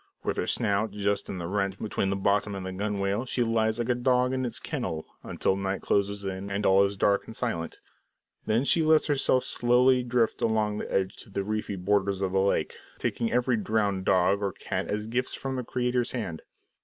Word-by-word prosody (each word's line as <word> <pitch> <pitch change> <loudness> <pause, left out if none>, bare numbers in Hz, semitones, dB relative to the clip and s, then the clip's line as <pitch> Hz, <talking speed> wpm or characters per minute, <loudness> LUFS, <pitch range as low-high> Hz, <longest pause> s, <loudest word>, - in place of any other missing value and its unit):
With - - -1
her - - -1
snout 100 +2 +1
just 100 -1 -1
in 95 - -4
the 85 - -4
rent 100 +1 -1
between 100 -2 -2
the 100 - 0
bottom 100 +1 +1
and 95 -1 -5
the 95 - -4
gunwale, 100 +2 -1
she 125 - +1
lies 110 -1 +1
like 120 0 -2
a - - +5
dog 125 +1 +2
in 130 -1 -1
its 120 -1 -3
kennel, 95 - -4 0.2
until 95 - 0
night 95 0 -3
closes 100 0 0
in 95 +1 -4
and 100 +1 -2
all 95 +1 +6
is 100 0 -1
dark 100 +1 +2
and 110 - -9
silent. 115 -10 -3 0.7
Then 115 +5 +2
she 165 - +4
lets 155 0 +4
herself 135 -3 +2
slowly 125 +1 +3
drift 120 -2 0
along 105 -2 +1
the - - -6
edge 95 +1 0
to - - -9
the 100 0 -2
reedy 105 0 -3
borders 100 +1 0
of 95 - 0
the 95 - +2
lake, 100 +1 0 0.2
taking 115 - -1
every 125 0 +2
drowned 105 -3 0
dog 95 +2 +3
or 100 -2 -1
cat 95 -1 -4
as 105 +1 -2
gifts 120 +3 -2
from 135 -1 -4
the 125 - -2
Creator's 125 0 -1
hand. 100 -10 -4
105 Hz, 210 wpm, -27 LUFS, 100-120 Hz, 0.7 s, all